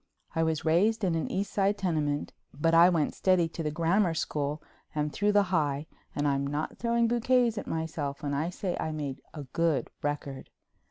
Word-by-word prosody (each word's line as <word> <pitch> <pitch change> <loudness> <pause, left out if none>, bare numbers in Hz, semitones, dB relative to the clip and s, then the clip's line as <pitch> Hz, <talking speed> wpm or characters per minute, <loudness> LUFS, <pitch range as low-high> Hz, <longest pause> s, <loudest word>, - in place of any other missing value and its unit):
I 165 - +1
was 160 -1 0
raised 205 +8 +3
in 180 -3 +2
an 165 -1 -1
East 195 +2 -2
Side 200 +1 +2
tenement, 150 -6 -1 0.3
but 165 +2 +2
I 170 +2 +8
went 165 -5 +1
steady 185 -3 +3
to 165 - -6
the 155 - -1
Grammar 170 +3 +2
school 150 -1 -2 0.4
and 150 0 -1
through 210 +1 +2
the 205 -2 +3
High 145 -3 +1 0.3
and 145 0 +1
I'm 140 0 +1
not 145 +2 -3
throwing 235 0 +2
bouquets 240 0 +2
at - - -8
myself 155 -3 -3
when 145 -1 -1
I 155 +4 0
say 180 0 -3
I 160 - -2
made 145 -3 -4
a 150 - -5
good 160 +2 0
record. 145 -2 -4
160 Hz, 195 wpm, -29 LUFS, 145-190 Hz, 0.4 s, I